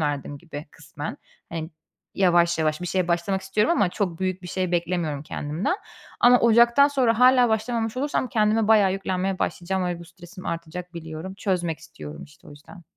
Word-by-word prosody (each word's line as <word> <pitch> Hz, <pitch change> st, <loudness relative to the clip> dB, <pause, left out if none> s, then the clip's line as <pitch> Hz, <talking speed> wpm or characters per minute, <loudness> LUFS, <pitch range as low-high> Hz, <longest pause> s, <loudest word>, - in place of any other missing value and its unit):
verdim 145 Hz, -1 st, -2 dB
gibi 160 Hz, -2 st, -9 dB
kısmen. 155 Hz, -1 st, -7 dB, 0.3 s
Hani, 165 Hz, -1 st, -5 dB, 0.4 s
yavaş 175 Hz, -3 st, +3 dB
yavaş 155 Hz, 0 st, 0 dB
bir 180 Hz, -, -4 dB
şeye 180 Hz, 0 st, 0 dB
başlamak 175 Hz, +3 st, 0 dB
istiyorum 210 Hz, -, +1 dB
ama 235 Hz, -, +3 dB
çok 175 Hz, -3 st, -2 dB
büyük 185 Hz, 0 st, -2 dB
bir 180 Hz, -, -8 dB
şey 185 Hz, 0 st, -2 dB
beklemiyorum 170 Hz, -4 st, -1 dB
kendimden. 155 Hz, -, -2 dB, 0.4 s
Ama 245 Hz, 0 st, +6 dB
ocaktan 235 Hz, +4 st, +6 dB
sonra 250 Hz, -5 st, +2 dB
hâlâ 250 Hz, -1 st, +6 dB
başlamamış 225 Hz, +1 st, -1 dB
olursam 275 Hz, -2 st, -1 dB
kendime 215 Hz, 0 st, +2 dB
bayağı 205 Hz, -4 st, +5 dB
yüklenmeye 190 Hz, 0 st, -2 dB
başlayacağım 185 Hz, +1 st, -1 dB
ve 175 Hz, -1 st, -2 dB
bu 170 Hz, -, -10 dB
stresim 175 Hz, +3 st, -12 dB
artacak, 170 Hz, +2 st, -5 dB
biliyorum. 165 Hz, +3 st, -7 dB
Çözmek 175 Hz, -5 st, -1 dB
istiyorum, 75 Hz, -, -10 dB
işte, 150 Hz, -, -20 dB
o -, -, -12 dB
yüzden. 150 Hz, +5 st, -14 dB
180 Hz, 170 wpm, -24 LUFS, 165-215 Hz, 0.4 s, Ama